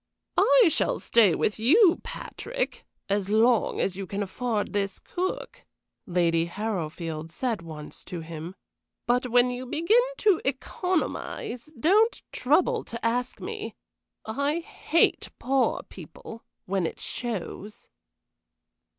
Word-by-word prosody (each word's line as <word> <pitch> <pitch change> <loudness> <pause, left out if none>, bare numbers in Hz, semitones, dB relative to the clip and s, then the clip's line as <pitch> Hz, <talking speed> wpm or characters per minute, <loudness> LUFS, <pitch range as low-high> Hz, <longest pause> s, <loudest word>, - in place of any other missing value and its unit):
"I 480 -8 +6
shall - - +1
stay 210 -8 +4
with 210 - 0
you, 335 - +5
Patrick, - - -5 0.2
as 200 -1 0
long 225 +2 +3
as 185 - 0
you 195 0 -5
can 200 +2 -2
afford 215 +2 -2
this 200 -1 -1
cook," 375 +7 -4 0.4
Lady 170 -2 +2
Harrowfield 165 -5 -4
said 225 +3 -2
once 155 -2 -9
to 175 -2 -5
him; 165 +2 -7 0.5
"but 250 +1 +2
when 245 +1 +4
you 250 +1 -5
begin 335 - +4 0.2
to 410 -5 +3
economize, 270 -4 -2
don't 425 - +3
trouble 370 - +2
to 230 0 -6
ask 245 +2 0
me. 425 +1 -6 0.5
I 280 +9 -1
hate 330 0 +1
poor 265 0 +1
people, 230 0 -11 0.2
when 190 -4 0
it - - -8
shows." 210 -2 -5
235 Hz, 120 wpm, -27 LUFS, 190-310 Hz, 0.5 s, I